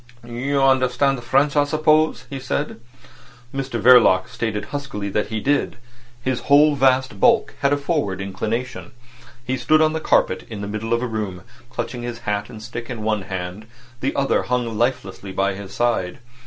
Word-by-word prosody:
"You 135 +4 -1
understand 130 0 +2
French, 135 +4 +2
I 145 - +5
suppose?" 155 -3 +2
he 135 +1 -6
said. 135 +2 -3 0.7
Mr 135 -3 -3
Verloc 115 -6 +6
stated 105 -2 -3
huskily 135 -8 -4
that 105 +2 -1
he 110 0 -3
did. 140 +5 0 0.5
His 130 -1 -1
whole 145 +1 +6
vast 130 -5 +2
bulk - - +3
had 140 - +2
a 145 - +3
forward 140 - -1
inclination. 110 +6 -4 0.5
He 130 +1 -1
stood 155 +4 +3
on 155 0 +3
the 160 - -1
carpet 95 -10 +2
in 110 -3 -6
the 100 - -4
middle 110 +2 -4
of 115 0 +2
the - - -1
room, 105 -6 -4 0.3
clutching 125 0 -5
his 120 -1 -5
hat 105 +1 -2
and 110 -3 -10
stick 120 0 -7
in 115 -4 -5
one 105 -1 0
hand; 95 +2 -6 0.3
the 135 +2 -2
other 140 -1 +2
hung 120 -2 -2
lifelessly 105 -5 -2
by 95 +1 0
his 100 0 -9
side. 115 -7 0
120 Hz, 175 wpm, -21 LUFS, 105-135 Hz, 0.7 s, Verloc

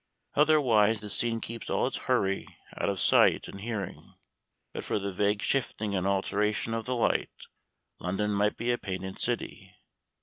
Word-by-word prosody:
Otherwise 125 -9 +4
the 105 -1 -5
scene 115 -1 0
keeps 115 0 -6
all - - +1
its - - -2
hurry 95 0 +1 0.3
out - - -1
of 100 -2 -2
sight - - +4
and 100 - -9
hearing. 105 -4 -5 0.6
But - - -5
for - - -1
the 100 -1 -3
vague 100 +2 0
shifting 110 -5 0
and 95 -1 0
alteration 105 +3 0
of 115 -1 -2
the 125 - 0
light, 120 - 0 0.5
London 95 +4 -1
might 105 +1 +1
be 120 +1 0
a 120 - 0
painted 95 -1 -5
city. - - -2
105 Hz, 165 wpm, -29 LUFS, 100-115 Hz, 0.6 s, Otherwise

